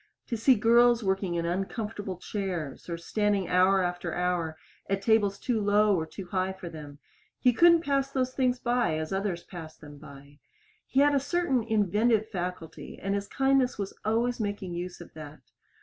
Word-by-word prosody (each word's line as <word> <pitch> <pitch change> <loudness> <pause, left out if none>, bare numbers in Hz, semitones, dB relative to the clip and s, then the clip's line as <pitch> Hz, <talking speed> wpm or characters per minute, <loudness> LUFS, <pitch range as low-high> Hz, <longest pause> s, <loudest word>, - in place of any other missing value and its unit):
To 235 - -1
see 240 +4 +4
girls 235 +2 +4
working 190 -2 0
in 170 0 -1
uncomfortable 195 +2 -3
chairs, 180 -7 -5
or 170 - -3
standing 205 +2 0
hour 185 +1 +4
after 175 -1 -3
hour 175 -3 -1 0.3
at 195 0 -1
tables 205 -2 +3
too 230 0 -1
low 205 0 +3
or 160 -2 -2
too 185 +4 -8
high 185 +1 -1
for 190 -2 -8
them 150 -3 -10 0.4
he 250 -2 +4
couldn't 335 +4 +5
pass 275 -3 0
those 255 -2 -1
things 255 -2 +1
by 245 -9 0
as 155 +3 -4
others 195 -3 -2
passed 165 -3 -10
them 145 -1 -12
by. 140 +1 -14 0.5
He 270 - +2
had 290 0 +4
a 280 - +3
certain 285 -2 0
inventive 220 +1 +1
faculty, 180 -4 -6
and 195 0 -2
his 200 0 -2
kindness 270 0 +2
was 200 -2 -4
always 235 +3 0
making 205 -4 -3
use 175 +1 -6
of 175 - -13
that. 155 -2 -10
200 Hz, 180 wpm, -28 LUFS, 175-235 Hz, 0.5 s, couldn't